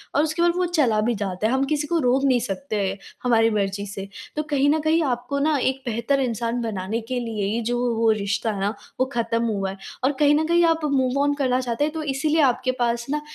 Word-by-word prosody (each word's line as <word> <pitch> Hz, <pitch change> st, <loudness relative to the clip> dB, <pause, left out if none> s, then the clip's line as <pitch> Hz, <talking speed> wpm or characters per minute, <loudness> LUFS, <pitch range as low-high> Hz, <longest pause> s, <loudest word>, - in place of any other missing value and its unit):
और 290 Hz, -, +4 dB
उसके 315 Hz, +2 st, -1 dB
बाद 345 Hz, 0 st, +5 dB
वो 365 Hz, -, +2 dB
चला 225 Hz, -7 st, +3 dB
भी 235 Hz, +2 st, 0 dB
जाता 200 Hz, 0 st, -2 dB
है, 235 Hz, -, 0 dB
हम 265 Hz, +1 st, +2 dB
किसी 295 Hz, +1 st, -1 dB
को 340 Hz, -, +1 dB
रोक 260 Hz, -1 st, +2 dB
नहीं 255 Hz, -3 st, +4 dB
सकते 205 Hz, -4 st, -2 dB, 0.3 s
हमारी 225 Hz, -2 st, +4 dB
मर्ज़ी 200 Hz, -2 st, -1 dB
से। 195 Hz, 0 st, -6 dB, 0.3 s
तो 305 Hz, -, -1 dB
कहीं 285 Hz, -2 st, +1 dB
न 310 Hz, +2 st, +3 dB
कहीं 325 Hz, +1 st, +3 dB
आपको 255 Hz, +1 st, -2 dB
ना 300 Hz, +1 st, +2 dB
एक 265 Hz, 0 st, 0 dB
बेहतर 235 Hz, +4 st, 0 dB
इंसान 235 Hz, -1 st, -1 dB
बनाने 220 Hz, 0 st, -3 dB
के 250 Hz, -, 0 dB
लिए 225 Hz, -4 st, -3 dB
ही 235 Hz, -, -1 dB
जो 245 Hz, -, 0 dB
वो 245 Hz, -1 st, 0 dB
वो 225 Hz, -, +4 dB
रिश्ता 210 Hz, +1 st, -1 dB
है 205 Hz, -, -5 dB
ना, 200 Hz, +2 st, 0 dB, 0.3 s
वो 260 Hz, -, +3 dB
ख़त्म 230 Hz, -1 st, 0 dB
हुआ 200 Hz, -4 st, -1 dB
है। 195 Hz, -, -9 dB, 0.3 s
और 265 Hz, -, +3 dB
कहीं 295 Hz, 0 st, +5 dB
न 310 Hz, +1 st, +1 dB
कहीं 340 Hz, +1 st, +4 dB
आप 325 Hz, -1 st, +1 dB
मूव 270 Hz, -2 st, +1 dB
ऑन 290 Hz, 0 st, +2 dB
करना 260 Hz, -3 st, +1 dB
चाहते 245 Hz, +2 st, -1 dB
हैं, 305 Hz, +1 st, -1 dB
तो 320 Hz, -1 st, -4 dB
इसीलिए 300 Hz, +3 st, +1 dB
आपके 255 Hz, -1 st, +2 dB
पास 240 Hz, -1 st, +3 dB, 0.2 s
ना 300 Hz, +1 st, -1 dB
250 Hz, 245 wpm, -23 LUFS, 225-290 Hz, 0.3 s, बाद